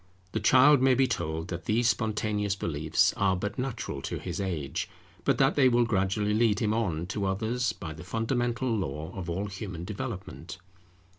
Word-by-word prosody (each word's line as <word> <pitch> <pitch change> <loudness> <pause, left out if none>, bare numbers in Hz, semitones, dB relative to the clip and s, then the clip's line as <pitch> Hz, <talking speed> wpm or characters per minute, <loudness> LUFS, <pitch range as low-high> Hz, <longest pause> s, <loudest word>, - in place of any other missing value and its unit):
The 110 - -1
child 130 +6 +6
may 130 -1 +5
be 135 +1 +4
told 80 -7 -3
that 85 -1 -5
these 115 +2 +2
spontaneous 105 -3 0
beliefs 80 -4 +1
are 95 -1 +2
but 105 +6 -4
natural 125 - -3
to - - -4
his 90 +1 -4
age, 80 -8 -3 0.4
but - - +3
that - - +4
they 130 -3 +5
will 120 -1 +3
gradually 105 -1 +1
lead 110 -2 +3
him 105 -1 +1
on 90 -8 -1
to 100 +2 -3
others, 110 +6 0
by 80 -4 -7
the 80 - -10
fundamental 120 +4 -1
law 80 -5 -3
of 90 -3 -5
all 95 +4 -2
human 95 -4 -6
development. 95 - -6
105 Hz, 175 wpm, -28 LUFS, 85-115 Hz, 0.4 s, child